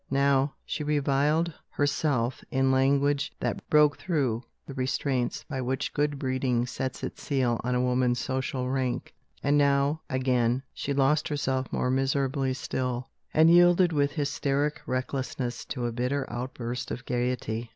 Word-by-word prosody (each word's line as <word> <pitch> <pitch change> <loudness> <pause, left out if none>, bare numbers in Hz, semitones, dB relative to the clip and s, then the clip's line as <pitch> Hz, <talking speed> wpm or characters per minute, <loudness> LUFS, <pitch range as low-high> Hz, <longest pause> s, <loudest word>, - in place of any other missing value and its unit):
Now, 140 0 +2
she 155 - -3
reviled 150 +3 +1 0.2
herself 140 -4 0
in 135 0 +2
language 140 +2 +2
that - - -3
broke 150 -1 +4
through 135 -10 0 0.2
the 140 - -8
restraints 130 -1 -1
by 135 -3 -3
which 130 +2 -2
good 145 -1 0
breeding 130 -2 0
sets 130 +1 -4
its - - -5
seal 130 -5 0
on 125 +1 0
a 125 - +2
woman's 125 -1 +2
social 130 0 -2
rank. 130 -1 -2 0.3
And 145 +1 +3
now, 140 +2 +2
again, 130 -1 +1
she 140 - -4
lost 140 +4 +2
herself 135 -4 -1
more 125 - 0
miserably 135 0 0
still, 125 -1 -3 0.2
and 160 +1 +6
yielded 175 0 +6
with 145 -1 +1
hysteric 145 0 -1
recklessness 130 -1 -3
to 125 -4 -4
a 120 - -1
bitter 125 +4 -1
outburst 120 -1 -4
of 125 - -5
gaiety. 120 -2 -2
135 Hz, 145 wpm, -27 LUFS, 125-145 Hz, 0.3 s, and